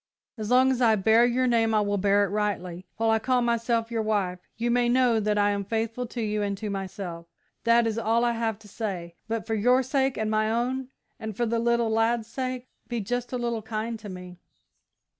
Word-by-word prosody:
As 215 -3 -5
long 255 +1 +5
as 255 -1 -1
I 225 -2 +5
bear 220 +4 +4
your 250 +1 +1
name 225 -2 +2
I 215 - +4
will 205 -1 0
bear 200 +1 +3
it - - -5
rightly; 190 -4 -2
while 225 0 +2
I 220 - +3
call 250 +1 +1
myself 235 0 0
your 230 -1 0
wife, 200 -4 -1 0.2
you 235 +1 0
may 240 0 +2
know 245 -2 +3
that 210 0 0
I 205 0 +3
am 200 0 -1
faithful 225 +4 -2
to 240 0 -5
you 210 0 -1
and 200 -1 -1
to 210 +1 -4
myself. 185 -3 -5 0.4
That 235 0 +5
is 225 0 -1
all 230 +1 +2
I 240 - +2
have 225 -2 -1
to - - -12
say, 190 -5 -5
but 225 -1 -2
for 225 - -2
your 250 +5 +3
sake 265 0 0
and 220 0 -1
my 215 0 +1
own 250 +3 -1 0.3
and 220 -2 -6
for 240 - +1
the 230 0 0
little 235 -1 +1
lad's 225 0 +1
sake 255 0 -4 0.2
be 240 -1 -2
just 245 +3 -3
a 250 - -1
little 235 -2 -2
kind 220 +1 -4
to 210 -1 -9
me!" 180 -1 -9
225 Hz, 225 wpm, -26 LUFS, 210-240 Hz, 0.4 s, long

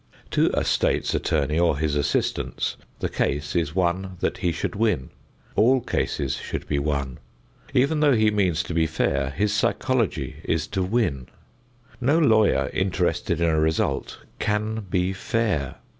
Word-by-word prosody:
To - - +3
a - - +1
State's - - +1
Attorney 75 0 0
or 85 -4 +3
his 75 -1 0
assistants 70 -1 -1 0.3
the - - +1
case 75 +2 -2
is 80 -2 0
one 95 +1 0
that - - -1
he 90 - +1
should 85 - -3
win. 105 - 0 0.4
All 130 +4 +4
cases - - -2
should - - -5
be 70 - 0
won. 70 -3 -2 0.6
Even 140 +5 +3
though 145 -3 +4
he 110 -1 +3
means 95 -6 +1
to - - -5
be 80 -1 +2
fair, 70 -4 0
his 100 +8 0
psychology 110 - 0
is 80 -1 0
to 95 - -1
win. 90 - 0 0.7
No 140 +6 +3
lawyer 110 -10 +3
interested 90 -3 0
in 85 - +3
a 80 - +2
result 80 +1 0 0.2
can 110 0 -1
be 90 0 +1
fair. 95 - -1
90 Hz, 155 wpm, -24 LUFS, 75-110 Hz, 0.7 s, All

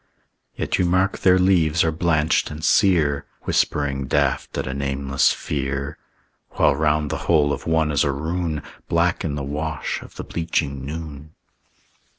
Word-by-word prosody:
Yet - - -1
you 90 - +3
mark 95 +3 +1
their 95 -1 +5
leaves 85 -4 +3
are 80 - +1
blanched 80 -1 +1
and 75 +2 -5
sear, 80 -9 +3 0.2
Whispering 70 -2 0
daft - - 0
at - - -2
a 65 - -3
nameless 70 0 +1
fear. 70 0 -3 0.5
While 70 - +3
round 75 0 +1
the 80 - -1
hole 75 -3 +4
of - - -6
one 80 -1 +2
is 75 0 +2
a 70 - +1
rune, 80 +2 -3 0.3
Black 85 +1 +1
in 75 -3 -2
the 70 - -4
wash 75 +2 -3
of - - -13
the - - -6
bleaching 75 -5 -2
noon. 75 0 -7
75 Hz, 160 wpm, -22 LUFS, 70-85 Hz, 0.5 s, their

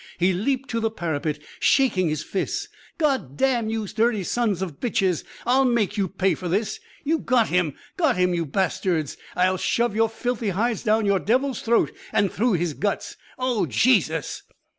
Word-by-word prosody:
He 180 +2 +3
leaped 265 +8 -1
to 230 - 0
the 225 0 +1
parapet, 155 -7 -2 0.2
shaking 195 - +3
his 155 0 -2
fists. 400 - -3 0.3
"God 265 - 0
damn 245 -5 +1
you 220 -2 -2
dirty 220 0 +1
sons 205 -2 0
of 165 -7 -6
bitches. 190 -7 0 0.2
I'll 255 +3 +4
make 235 -5 +1
you 200 -3 +1
pay 190 +1 +1
for 180 - -5
this. 205 +5 -1 0.2
You 320 +2 +1
got 240 -4 +2
him, 175 -5 +1 0.2
got 315 - +2
him, 180 0 +2
you 170 -2 -1
bastards! 175 -2 0 0.2
I'll 185 +1 +2
shove 235 +3 0
your 225 0 +3
filthy 230 -1 -2
hides 220 +4 0
down 215 -1 +2
the 200 -1 +3
devil's 255 +5 0
throat 230 0 +2 0.2
and 200 -3 +2
through 230 +2 +1
his 175 -2 0
guts. 205 +6 -2 0.2
Oh, 245 -8 0
Jesus!" 160 - +2
210 Hz, 175 wpm, -24 LUFS, 180-240 Hz, 0.3 s, I'll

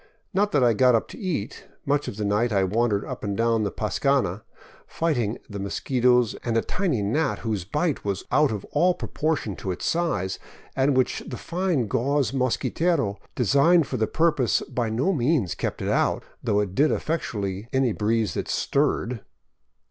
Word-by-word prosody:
Not 205 +2 +2
that 145 -3 +4
I 120 -2 +5
got 125 +2 +4
up 115 - 0
to - - -10
eat; 150 - -4 0.2
much 145 +1 +1
of 100 - -5
the 105 - -2
night 105 +4 +1
I 100 -2 +2
wandered 105 +1 +1
up - - -7
and 100 -1 -2
down 115 -1 +2
the 105 - 0
pascana, 110 -2 0 0.5
fighting 120 -10 -1
the 100 -1 -7
mosquitos 125 +3 +2
and 115 -2 0
a 115 - +2
tiny 165 - -1
gnat 145 +11 0
whose 105 -6 -2
bite 150 - -1
was 100 -2 -2
out 150 -1 +4
of 105 -3 -4
all 180 0 +3
proportion 150 - -2
to 95 - -5
its 90 - -3
size, 160 - -1 0.4
and 135 0 +2
which 130 - +1
the 125 - -5
fine 175 -7 -1
gauze 130 +1 0
mosquitero 135 - 0 0.2
designed 140 - +4
for 130 - -3
the 110 -1 +1
purpose 150 - +2
by 120 -3 -2
no 130 - +1
means 130 - +1
kept - - -4
out, - - +1 0.2
though 105 0 +2
it 100 -3 -3
did 145 +9 +3
effectually 105 - -2
any 130 -2 +2
breeze 110 +1 0
that - - -3
stirred. 125 -5 0
120 Hz, 175 wpm, -25 LUFS, 105-145 Hz, 0.5 s, I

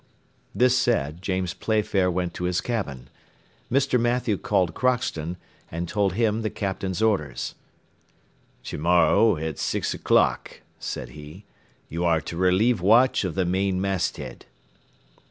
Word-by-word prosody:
This 125 0 +4
said, 90 - 0
James 95 -2 -2
Playfair 105 -4 +1
went 90 -1 -2
to 90 - -4
his 90 0 +1
cabin. 70 - -4 0.6
Mr. 130 -1 +2
Mathew 120 -2 +1
called 90 -2 0
Crockston, 90 -10 -1 0.3
and 85 +2 -4
told 100 -1 0
him 110 +1 +1
the 110 - -1
Captain's 95 -1 -3
orders. 100 -10 0 1.1
"To - - -6
morrow, 90 +5 +4
at 80 -1 -4
six - - -1
o'clock," - - +1 0.2
said - - -5
he, 75 +6 -12 0.4
"you 85 +2 -3
are 85 -2 +3
to 85 - -7
relieve 95 +5 +2
watch 115 +7 +4
of 90 -4 -3
the 95 - +1
main 95 +1 0
masthead." 95 -1 -3
95 Hz, 135 wpm, -25 LUFS, 85-110 Hz, 1.1 s, This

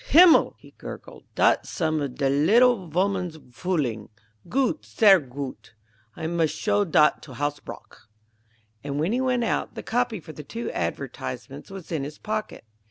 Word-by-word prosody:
"Himmel!" 335 +2 +7
he - - -17
gurgled; - - -10
"dot's - - +3
some 155 -2 -1
of 135 -3 -4
de 140 - 0
liddle 190 - +4
voman's 180 -1 -1 0.2
fooling. 140 - -2 0.4
Goot, 270 +3 0
sehr 200 -5 +5
goot! 135 -4 -8 0.4
I 160 - -6
mus' 165 -1 +1
show 205 +3 +1
dot 150 -3 +3
to 130 -4 -11
Hasbrouck." 145 -5 -6 0.7
And 140 0 -3
when 165 +6 0
he 250 +2 +1
went 250 -2 +1
out, 230 - -1
the - - -6
copy 240 -3 -1
for 160 -1 -11
the 150 - -8
two 230 +10 -5
advertisements - - -5
was 195 -3 -10
in 155 -4 -1
his 150 +2 -7
pocket. 215 - -4
170 Hz, 160 wpm, -25 LUFS, 145-220 Hz, 0.7 s, Himmel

